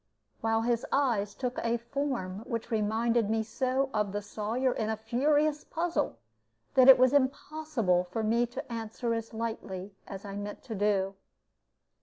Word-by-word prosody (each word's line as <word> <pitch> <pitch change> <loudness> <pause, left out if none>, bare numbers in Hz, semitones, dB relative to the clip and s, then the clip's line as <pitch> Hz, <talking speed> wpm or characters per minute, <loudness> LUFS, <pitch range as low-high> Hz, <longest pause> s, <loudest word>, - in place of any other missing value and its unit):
while 225 0 +1
his 235 -1 +1
eyes 230 -8 +1
took 250 -1 -3
a 235 0 +1
form 235 -6 -3
which 230 +1 -4
reminded 225 +1 +1
me 220 0 +1
so 260 +4 0
of 210 -2 0
the 205 - -1
Sawyer 220 +5 -1
in 220 -2 -2
a 220 - -1
furious 290 +7 +1
puzzle, 330 - -1 0.6
that 260 0 +7
it 265 - +11
was 255 +1 +4
impossible 275 - +1
for 200 +5 -3
me 235 +3 +2
to 240 - -7
answer 230 +1 -2
as 230 0 -3
lightly 210 -4 -5
as 195 +1 -7
I 200 0 -6
meant 205 0 -6
to 230 - -6
do. 200 -2 +1
230 Hz, 160 wpm, -30 LUFS, 210-255 Hz, 0.6 s, it